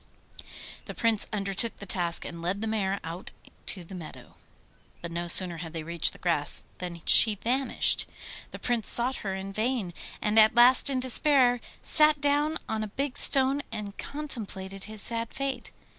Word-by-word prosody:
The - - -9
Prince 225 -3 +1
undertook 200 +2 -1
the 200 - -9
task 175 -3 0
and 170 -1 -8
led 185 +4 -3
the - - -2
mare 200 -3 -2
out 165 +3 -7 0.4
to 185 - -3
the 170 - -13
meadow. 170 -4 -11 0.7
But 170 - -8
no 170 +1 -4
sooner 175 -1 +5
had 165 -1 -8
they 165 -2 -6
reached 170 0 -1
the - - -14
grass 165 -5 +1
than 175 -2 -7
she 220 -2 +5
vanished. 255 +6 0 0.4
The - - -9
Prince 235 -4 -2
sought 245 +2 +5
for - - -8
her 190 - -3
in 195 +1 -7
vain, 220 -4 -2 0.3
and 210 +1 +2
at 215 +2 +5
last 250 +3 +6
in 265 -2 -1
despair 255 -1 +2 0.2
sat 305 -1 +3
down 290 +2 0
on 220 -1 -3
a - - -5
big 275 +5 -4
stone 270 +1 +5
and 210 -2 -7
contemplated 200 -10 -5
his 215 -1 -2
sad 230 -1 -2
fate. 275 -1 -4
215 Hz, 175 wpm, -27 LUFS, 185-255 Hz, 0.7 s, last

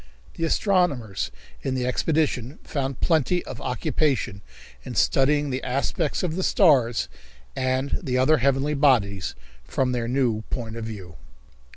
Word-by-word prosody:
The 165 - -2
astronomers 160 - +1 0.3
in 135 -1 -2
the 125 -1 -1
expedition 140 -1 0
found 135 -2 -3
plenty 170 +2 +2
of 130 - -7
occupation 125 - -1 0.4
in - - -7
studying 145 +1 +3
the 130 - -2
aspects 140 +6 -1
of 165 -3 -1
the 190 - -1
stars 130 - +3 0.5
and 130 +1 0
the 130 -7 -1
other 140 +5 +4
heavenly 140 +2 +1
bodies 105 - +2 0.3
from 125 - 0
their 120 -2 -1
new 120 -4 +1
point 115 -3 -4
of 115 -1 -5
view. 95 -6 -8
130 Hz, 140 wpm, -25 LUFS, 120-150 Hz, 0.5 s, other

